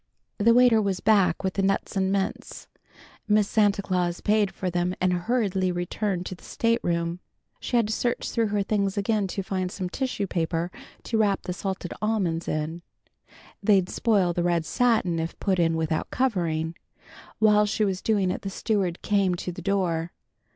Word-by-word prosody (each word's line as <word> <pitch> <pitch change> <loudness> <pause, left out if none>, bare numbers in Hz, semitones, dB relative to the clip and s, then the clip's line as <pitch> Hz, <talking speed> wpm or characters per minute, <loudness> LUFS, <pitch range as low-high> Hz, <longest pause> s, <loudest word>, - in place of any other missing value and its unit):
The 230 +3 +5
waiter 245 -3 +6
was 195 -3 -1
back 195 -6 +3
with 190 -1 -1
the 195 - 0
nuts 195 +1 0
and 190 0 +1
mints. 195 -1 -3 0.6
Miss 210 -1 +3
Santa 205 -2 +2
Claus 180 -2 -1
paid 210 -1 +2
for 185 -1 -3
them, 175 +1 0
and 185 0 +2
hurriedly 190 -1 0
returned 180 +1 -2
to - - -5
the 175 - -14
state 230 0 0
room. 170 0 -1 0.4
She 245 - -1
had 230 - +3
to 215 - -2
search 240 +2 -1
through 230 -2 +1
her 205 -1 0
things 200 -1 -1
again 205 0 +1
to 195 +1 -4
find 185 -1 -2
some 185 -2 -4
tissue 250 -2 -2
paper 170 -1 -2 0.3
to 225 - -1
wrap 200 -3 +2
the 180 - -3
salted 190 -1 -4
almonds 190 -7 0
in. 155 +2 -3 0.8
They'd 195 -3 +3
spoil 200 -7 +2
the 175 - -1
red 170 -2 +1
satin 215 -5 +1
if 165 +1 -4
put 190 -3 0
in 165 -1 +2
without 160 0 -1
covering. 170 -10 0 0.6
While 210 -1 +4
she 215 +1 +1
was 190 -2 -2
doing 200 -4 +1
it - - -4
the 195 - -4
steward 195 -3 -1
came 195 -3 +2
to 180 - -4
the 180 - -8
door. 175 -3 -1
190 Hz, 180 wpm, -26 LUFS, 175-210 Hz, 0.8 s, waiter